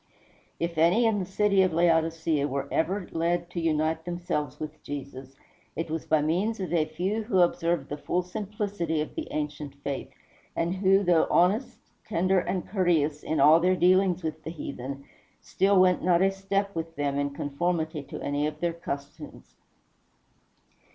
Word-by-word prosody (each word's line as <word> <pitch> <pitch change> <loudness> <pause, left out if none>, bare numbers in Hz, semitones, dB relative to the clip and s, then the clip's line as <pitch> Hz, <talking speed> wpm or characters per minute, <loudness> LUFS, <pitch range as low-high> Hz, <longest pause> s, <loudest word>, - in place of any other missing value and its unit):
If 170 -1 -2
any 180 +9 +4
in 220 -2 +2
the 185 - -3
city 195 0 +3
of 185 -3 +2
Laodicea 165 -3 +2
were 140 0 -3
ever 185 +3 0
led 170 +1 -1
to 170 - -3
unite 160 0 0
themselves 175 -5 -3
with 155 0 -7
Jesus, 135 -2 -8 0.4
it 165 0 -3
was 160 -1 -4
by 155 -2 +3
means 190 +9 0
of 180 -3 -3
a 160 -3 +3
few 180 +8 -2
who 190 -5 +3
observed 170 -3 +1
the 145 - -5
full 180 +1 -1
simplicity 200 -4 -3
of 155 - -3
the 320 - -5
ancient 150 -2 -4
faith, 140 -1 -4 0.5
and 170 +3 -1
who, 195 +1 +4
though 175 -3 +3
honest, 200 +9 +2 0.3
tender, 185 -1 +1
and 180 0 -3
courteous 160 -6 +1
in 155 -1 -2
all 150 +4 +7
their 185 +2 +3
dealings 185 0 +3
with 155 -1 -4
the - - -5
heathen, 140 -3 -6 0.3
still 195 +1 +2
went 185 -1 +4
not 175 0 +4
a 195 - +3
step 195 +1 -2
with 165 0 -4
them 140 -1 -1
in 145 0 0
conformity 160 +2 -2
to 140 - -8
any 145 +1 0
of 150 - -6
their 170 -1 0
customs. 140 -4 -8
170 Hz, 170 wpm, -27 LUFS, 150-185 Hz, 0.5 s, all